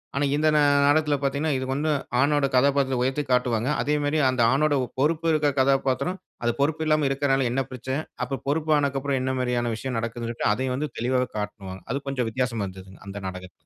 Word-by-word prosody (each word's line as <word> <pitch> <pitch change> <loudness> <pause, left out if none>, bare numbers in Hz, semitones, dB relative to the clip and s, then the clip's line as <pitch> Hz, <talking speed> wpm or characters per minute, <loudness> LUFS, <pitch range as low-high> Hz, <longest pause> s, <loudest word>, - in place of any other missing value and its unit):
ஆனா, 140 +1 +1
இந்த 155 +1 +2
நா - - +5 0.3
நாடகத்துல 150 0 +3
பாத்தீங்கன்னா, 140 +2 0
இதுக்கு 130 0 -2
வந்து 155 +2 0 0.3
ஆணோட 145 +1 +3
கதாபாத்திரத்த 135 -1 +2
உயர்த்தி 135 +3 0
காட்டுவாங்க. 125 -1 +1
அதேமாரி, 150 +1 0
அந்த 130 -2 0
ஆணோட 145 +2 +2 0.3
பொறுப்பு 160 +3 +1
இருக்கிற 150 -2 +2
கதாபாத்திரம், 135 +6 +1 0.2
அது 120 - +2
பொறுப்பு 155 +2 +1
இல்லாம 155 -2 +3
இருக்குறனால 135 -2 +1
என்ன 135 +2 0
பிரச்சன? 130 +4 -3 0.2
அப்ப 135 +1 -4
பொறுப்பானது 145 -2 +1
அப்புறம் 140 -1 -1
என்ன 130 0 -1
மாரியான 120 -2 0
விஷயம் 125 +1 -4
நடக்குதுன்னு 115 0 -4
சொல்லிட்டு, 115 - 0
அதையும் 130 +2 -2
வந்து 150 +3 -2
தெளிவாக 125 +1 0
காட்டுவாங்க. 100 -2 -6
அது 140 +1 -3
கொஞ்சம் 125 -4 -1
வித்தியாசமா 120 -3 -1
இருந்ததுங்க. 95 0 -12
அந்த 100 +1 -7
நாடகத்துல. 90 0 -7
135 Hz, 180 wpm, -25 LUFS, 125-145 Hz, 0.3 s, நா